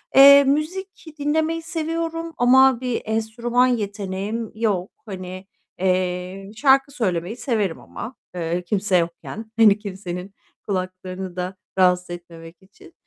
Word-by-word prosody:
Eee, 280 +1 +10
müzik 330 +9 -2
dinlemeyi 315 +3 0
seviyorum 330 0 -3
ama 260 +1 +5
bir 250 -2 -1
enstrüman 230 +3 +1
yeteneğim 205 -1 -3
yok. 205 -5 -1
Hani, 185 -2 -7 0.3
eee, 185 +1 -1
şarkı 270 +2 +4
söylemeyi 200 - -2
severim 215 - -1
ama, 100 - -8 0.2
eee, 170 +1 -2
kimse 195 0 +1
yokken. 175 +6 -4
Hani, 210 -2 +7
kimsenin 190 -2 -6 0.3
kulaklarını 185 -1 -4
da 180 +1 -4 0.2
rahatsız 180 -1 +3
etmemek 170 -1 -10
için. 325 - -18
205 Hz, 115 wpm, -22 LUFS, 185-265 Hz, 0.3 s, Eee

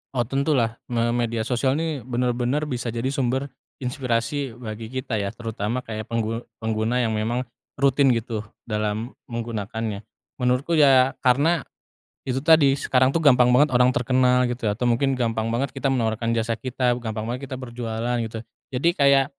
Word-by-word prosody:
Oh 120 - +2
tentulah 135 -3 0
me 120 -1 0
media 115 -1 -1
sosial 130 +3 +1
nih 160 -2 -2
benar-benar 125 +3 0
bisa 125 -5 -3
jadi 120 +3 -2
sumber 135 0 -1 0.3
inspirasi 125 0 -2
bagi 110 -2 -7
kita 125 -2 -3
ya 100 +2 -3
terutama 115 +1 -3
kayak 110 -2 -6
penggu 115 0 -2 0.2
pengguna 110 +3 0
yang 115 - 0
memang 110 +3 -1 0.3
rutin 135 -1 +3
gitu 115 -1 -3 0.2
dalam 105 +2 -2 0.2
menggunakannya. 110 -3 -4 0.4
Menurutku 125 +6 +1
ya 135 -2 +6
karena, 145 +6 +3 0.7
itu 130 0 0
tadi 155 -4 +6
sekarang 130 -2 +2
tuh 165 +3 0
gampang 125 -4 +6
banget 130 +3 +4
orang 125 0 +5
terkenal 125 0 +3
gitu 120 -2 -2
ya 105 - -2
atau 125 - -2
mungkin 130 +3 +2
gampang 115 -2 0
banget 125 +3 -1
kita 135 0 -1
menawarkan 115 -2 0
jasa 115 0 0
kita, 125 -1 0
gampang 110 -2 -4
banget 125 +4 -4
kita 130 - -5
berjualan 120 -1 -3
gitu, 110 0 -6 0.3
jadi 135 +5 +1
kayak, 140 -4 +4
125 Hz, 160 wpm, -24 LUFS, 115-130 Hz, 0.7 s, ya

